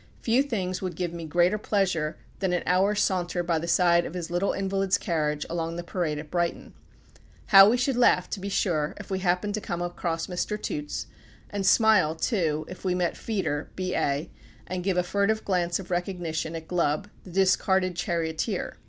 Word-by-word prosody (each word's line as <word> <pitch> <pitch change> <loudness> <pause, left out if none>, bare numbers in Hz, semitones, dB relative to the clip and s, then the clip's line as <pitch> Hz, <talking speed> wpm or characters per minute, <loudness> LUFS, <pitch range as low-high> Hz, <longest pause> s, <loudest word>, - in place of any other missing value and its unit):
Few 240 +3 +3
things 195 -10 -2
would 185 -3 -3
give 175 -1 -3
me 170 -1 -6
greater 175 +6 +2
pleasure 185 -7 0 0.2
than 190 -2 0
an 175 - 0
hour's 195 +3 +2
saunter 175 -1 0
by 170 -2 0
the 170 - -5
side 170 0 +4
of - - -7
his 175 -1 -5
little 175 +3 +1
invalid's 195 0 0
carriage 150 -4 -1
along 165 0 -3
the 175 - -4
Parade 170 -4 -2
at 150 0 -8
Brighton. 175 -1 -2 0.8
How 195 -1 +9
we 240 - +3
should 250 +1 +1
laugh, 235 -7 +4
to 205 - -3
be 200 +1 -4
sure, 155 -6 0
if 205 -1 -10
we 190 - 0
happened 185 +2 0
to 215 - -2
come 175 - -4
across 175 -1 -2
Mr. 190 +4 -3
Toots, 150 -5 -4 0.5
and 200 -2 -1
smile, 205 -8 +5
too, 160 -5 0
if 185 - -10
we 185 -1 +1
met 180 -1 0
Feeder, 190 -9 -2
B.A., 165 -5 -1 0.3
and 180 0 -4
give 185 -1 0
a 180 - +3
furtive 200 +4 0
glance 175 -3 +1
of 185 -2 -9
recognition 175 -3 -2
at 160 -1 -7
Glubb, 170 +1 0 0.2
the - - -12
discarded 185 0 +2
charioteer. 165 -2 -2
180 Hz, 190 wpm, -26 LUFS, 170-195 Hz, 0.8 s, How